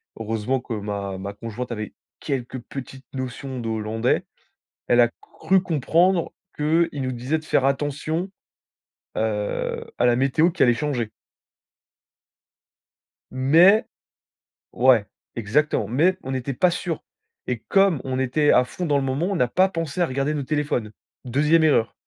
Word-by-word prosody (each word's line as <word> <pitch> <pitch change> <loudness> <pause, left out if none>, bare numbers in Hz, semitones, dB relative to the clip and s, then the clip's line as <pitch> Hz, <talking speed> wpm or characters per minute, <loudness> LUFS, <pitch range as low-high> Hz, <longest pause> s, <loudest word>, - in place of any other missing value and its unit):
on 110 - -6
heureusement 115 +4 -1
que 120 -1 -6
ma 100 -2 -4
ma 100 +2 -6
conjointe 115 +4 -6
avait 110 -3 -5 0.3
quelques 130 -1 -3
petites 135 +1 -9
notions 130 0 -5
de 115 - -4
hollandais. 110 +2 0 0.6
Elle 120 0 +5
a 120 - +4
cru 190 0 +1
comprendre 170 +2 +2 0.2
que 160 +3 +2
il 145 - -5
nous 130 -1 -2
disait 130 +6 -2
de 155 - -15
faire 135 - +2
attention, 145 +6 -1 0.9
heu, 105 -2 -2
à - - +3
la 120 -1 +4
météo 140 +6 +3
qui 180 - -1
allait 120 -2 +5
changer. 120 -4 -2 2.2
Mais 165 - +5 0.9
ouais 125 -4 +4 0.3
exactement. 115 +1 +1
Mais 160 - +2
on 130 - -5
n'était 130 +1 -2
pas 175 +8 +3
sûrs. 170 -2 -3 0.4
Et 125 -2 -2
comme 195 -8 +4
on 130 -1 -2
était 140 +3 +2
à 125 - +5
fond 180 +7 -5
dans 145 -3 +2
le 140 - 0
moment, 135 +6 -1
on 195 -2 -1
a 125 - +3
pas 185 +10 +3
pensé 165 -2 -3
à - - +4
regarder 135 +2 -1
nos 145 -2 -2
téléphones. 140 -6 -1 0.3
2e 150 +6 +3
erreur. 140 -7 +3
135 Hz, 155 wpm, -23 LUFS, 120-155 Hz, 2.2 s, Elle